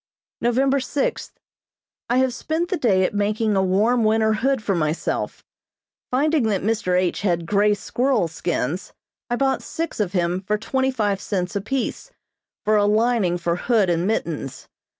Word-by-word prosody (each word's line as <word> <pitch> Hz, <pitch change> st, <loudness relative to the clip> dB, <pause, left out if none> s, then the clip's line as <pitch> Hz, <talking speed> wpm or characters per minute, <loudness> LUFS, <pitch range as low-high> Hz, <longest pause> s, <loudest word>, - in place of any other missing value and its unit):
November 265 Hz, +3 st, +2 dB
sixth: 270 Hz, +2 st, -3 dB, 0.7 s
I 245 Hz, -, +2 dB
have 260 Hz, -1 st, +2 dB
spent 320 Hz, +6 st, -2 dB
the 375 Hz, -, 0 dB
day 205 Hz, -, +2 dB
at 185 Hz, -, 0 dB
making 210 Hz, +1 st, 0 dB
a 190 Hz, -, +3 dB
warm 210 Hz, +6 st, +2 dB
winter 220 Hz, 0 st, +3 dB
hood 260 Hz, +2 st, 0 dB
for 200 Hz, -, 0 dB
myself. 155 Hz, -2 st, -2 dB, 0.7 s
Finding 300 Hz, +4 st, +2 dB
that 200 Hz, -4 st, 0 dB
Mr. 205 Hz, -4 st, +1 dB
H. 185 Hz, -1 st, -1 dB
had 170 Hz, -4 st, 0 dB
grey 205 Hz, +3 st, +3 dB
squirrel 245 Hz, -2 st, 0 dB
skins, 165 Hz, 0 st, -3 dB, 0.4 s
I 240 Hz, -, +1 dB
bought 270 Hz, +1 st, +1 dB
six 330 Hz, -5 st, -5 dB
of 200 Hz, -3 st, -1 dB
him 175 Hz, 0 st, 0 dB
for 210 Hz, +2 st, -1 dB
twenty 265 Hz, +5 st, 0 dB
five 205 Hz, -6 st, -1 dB
cents 185 Hz, -1 st, -2 dB
apiece, 255 Hz, -, -3 dB, 0.6 s
for 215 Hz, 0 st, +4 dB
a 205 Hz, -, +3 dB
lining 215 Hz, -4 st, +2 dB
for 170 Hz, -1 st, -1 dB
hood 210 Hz, -4 st, +2 dB
and 170 Hz, +2 st, 0 dB
mittens. 165 Hz, -10 st, -3 dB
210 Hz, 160 wpm, -22 LUFS, 185-245 Hz, 0.7 s, for